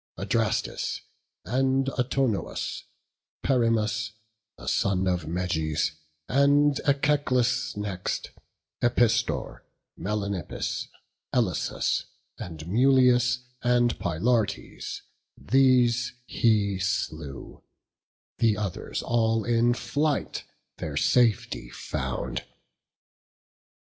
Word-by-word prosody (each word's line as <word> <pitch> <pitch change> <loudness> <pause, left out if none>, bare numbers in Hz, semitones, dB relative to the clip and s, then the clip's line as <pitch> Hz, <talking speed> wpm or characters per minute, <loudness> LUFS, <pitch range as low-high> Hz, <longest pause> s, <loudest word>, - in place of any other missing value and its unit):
Adrastus, - - -1 0.4
and 135 +2 +1
Autonous, 125 -4 -1 0.6
Perimus 110 -4 +1 0.4
The - - -11
son 95 -1 +1
of 90 -3 0
Meges, 80 -3 0 0.4
and 140 +1 +4
Echeclus 130 -4 +2
next; 100 -3 -3 0.5
Epistor, 120 -1 +1 0.4
Melanippus, 100 -2 -3 0.5
Elasus, - - 0 0.3
And 80 -3 -7
Mulius, 125 +3 +4 0.2
and 120 0 +2
Pylartes; 100 +4 -1 0.3
these 125 -2 +3
he 105 -5 +2
slew; 80 -7 -3 0.8
The 110 -3 +3
others 100 -5 -3
all 115 -1 +2
in 120 0 +3
flight 145 +3 -1 0.3
their - - -4
safety 115 - +2
found. 60 0 -4
115 Hz, 75 wpm, -27 LUFS, 100-125 Hz, 0.8 s, and